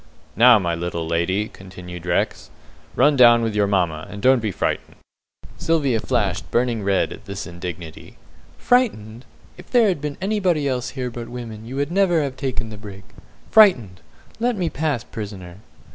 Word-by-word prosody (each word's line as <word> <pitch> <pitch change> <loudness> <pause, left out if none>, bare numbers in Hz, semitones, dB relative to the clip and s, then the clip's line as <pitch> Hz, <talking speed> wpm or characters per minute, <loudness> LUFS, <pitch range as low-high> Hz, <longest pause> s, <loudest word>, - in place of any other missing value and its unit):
"Now, 120 +1 +7
my 85 -4 -1
little 85 0 -3
lady," 90 +5 0
continued 90 -2 -10
Rex, 85 - -1 0.5
"run 145 0 +4
down 120 -2 +6
with 110 -1 -1
your 105 -1 +2
mamma, 85 -6 0
and 105 - -8
don't 130 +4 +4
be 110 - -1
frightened." - - -3 0.6
Sylvia 140 -8 +1
flashed 100 -2 -1
burning 120 -2 0
red 100 -1 0
at 120 - -14
this 100 -1 -6
indignity. 85 -2 -8 0.4
"Frightened! 125 - 0 0.3
If - - -13
there 235 -4 +4
had 175 -7 -2
been 150 -1 -4
anybody 190 -7 0
else 125 -2 -2
here 125 -1 -3
but 120 0 -7
women, 115 -3 -8
you 130 - -7 0.2
never 190 -1 +2
would 160 - +3
have 135 -2 -4
taken 130 -4 -4
the 105 - -8
brig. 100 -2 -10 0.5
Frightened! 130 - +5 0.4
Let 240 -1 0
me 175 -3 -1
pass, 150 -7 -1
prisoner!" 95 -5 -8
115 Hz, 165 wpm, -21 LUFS, 95-140 Hz, 0.6 s, Now